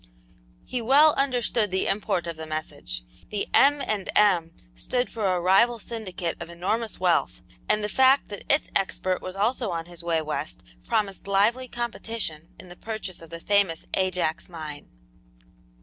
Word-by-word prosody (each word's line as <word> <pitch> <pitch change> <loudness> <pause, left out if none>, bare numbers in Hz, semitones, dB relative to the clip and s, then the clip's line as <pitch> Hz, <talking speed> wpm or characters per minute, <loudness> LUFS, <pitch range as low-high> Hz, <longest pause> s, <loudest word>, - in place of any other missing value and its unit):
He 250 - -3
well 285 +6 +6
understood 245 -5 +1
the 190 +1 0
import 195 -3 0
of 170 -1 -4
the 160 0 -7
message. 155 - -4 0.3
The 205 -1 -1
"M. 285 0 +5
and 205 -3 -2
M." 180 -6 +4 0.2
stood 245 - -1
for 215 -3 -1
a - - 0
rival 195 +7 +4
syndicate 190 -7 -4
of 170 - -6
enormous 200 +6 -2
wealth, 180 -2 +1 0.3
and 210 - +2
the - - 0
fact 265 +5 +4
that 205 - -7
its 280 - +2
expert 185 -1 0
was 185 0 -6
also 225 +3 0
on 165 -1 -3
his 175 -1 -10
way 170 -1 +1
west 155 0 -4 0.2
promised 200 -2 -1
lively 225 +6 +2
competition 225 -9 -4
in - - -11
the 175 - -11
purchase 215 -4 -6
of 165 - -12
the 165 +1 -6
famous 200 -3 +1
Ajax 180 -4 0
mine. 155 -4 -8
195 Hz, 165 wpm, -26 LUFS, 170-230 Hz, 0.3 s, well